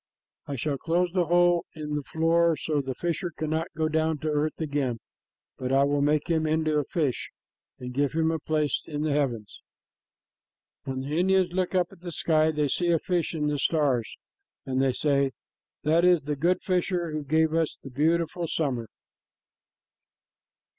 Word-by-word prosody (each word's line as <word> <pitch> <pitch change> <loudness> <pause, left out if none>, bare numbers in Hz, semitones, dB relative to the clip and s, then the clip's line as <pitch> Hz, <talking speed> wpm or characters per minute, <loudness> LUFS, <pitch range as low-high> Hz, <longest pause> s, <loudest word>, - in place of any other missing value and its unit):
I 140 - -3
shall 140 +1 -2
close 175 +1 +1
the 180 -3 +1
hole 175 +1 +3
in 150 -1 -5
the 150 - -1
floor 165 +2 +2
so 150 0 -1
the 135 -1 -5
fisher 175 +1 -2
cannot 160 +1 -1
go 160 -1 +1
down 160 0 +1
to 155 - -1
earth 150 +1 -1
again, 140 -6 -1 0.6
but 130 0 -2
I 135 +1 +4
will 140 0 +1
make 150 +2 +2
him 160 -2 +1
into 155 -1 +1
a 145 - -2
fish 145 -6 -1 0.5
and 125 0 -7
give 140 +2 0
him 160 0 +2
a 160 - -2
place 150 -2 0
in 150 -1 -3
the 155 - 0
heavens." 125 -8 -2 1.2
When 130 0 -3
the 145 +5 -2
Indians 185 -1 +2
look 185 0 -1
up 180 -1 +2
at 195 - -15
the 175 0 -7
sky, 155 -1 +2
they 150 -2 0
see 175 +5 0
a 170 - +4
fish 175 0 -1
in 150 -2 -1
the 150 -1 0
stars, 135 -7 +1 0.5
and 130 0 0
they 135 -1 +2
say, 140 -1 +1 0.5
"That 160 +3 +3
is 180 -4 +4
the 150 +1 -2
good 170 +6 +1
fisher 180 -2 0
who 155 -1 -3
gave 160 +2 +2
us 165 -1 0
the 135 - -9
beautiful 165 +4 0
summer." 130 -8 -1
155 Hz, 180 wpm, -27 LUFS, 145-170 Hz, 1.2 s, I